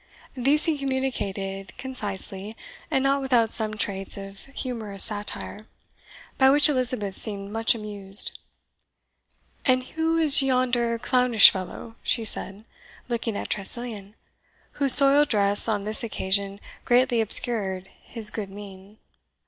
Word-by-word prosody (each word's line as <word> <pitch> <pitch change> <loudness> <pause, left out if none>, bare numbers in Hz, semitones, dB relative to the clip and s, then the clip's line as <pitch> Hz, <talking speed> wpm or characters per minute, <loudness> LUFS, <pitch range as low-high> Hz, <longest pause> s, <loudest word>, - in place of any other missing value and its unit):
These 275 +4 +1
he 315 -3 -2
communicated 200 -8 -5
concisely, 210 -4 -5 0.3
and 265 - -1
not 275 0 0
without 240 -4 0
some 215 -1 +2
traits 195 -2 -2
of 195 0 -11
humorous 230 -7 -2
satire, 210 0 -5 0.7
by 265 0 +5
which 290 +3 +5
Elizabeth 250 -8 -2
seemed 200 -2 -2
much 225 +2 0
amused. 205 -2 +3 1.2
"And 255 -1 0
who 320 +4 -3
is 305 -4 +6
yonder 250 -3 -1
clownish 250 -2 +5
fellow?" 195 +4 -9
she 230 - -1
said, 200 0 -4 0.4
looking 230 -3 -4
at - - -7
Tressilian, 210 0 -3 0.6
whose 275 -3 +8
soiled 280 +1 +4
dress 205 -1 +3
on 210 -3 -2
this 215 +5 -2
occasion 200 -2 -3 0.3
greatly 245 -1 +1
obscured 195 -4 0
his 220 -2 0
good 205 -3 -7
mien. 200 0 -14
225 Hz, 125 wpm, -23 LUFS, 200-255 Hz, 1.2 s, whose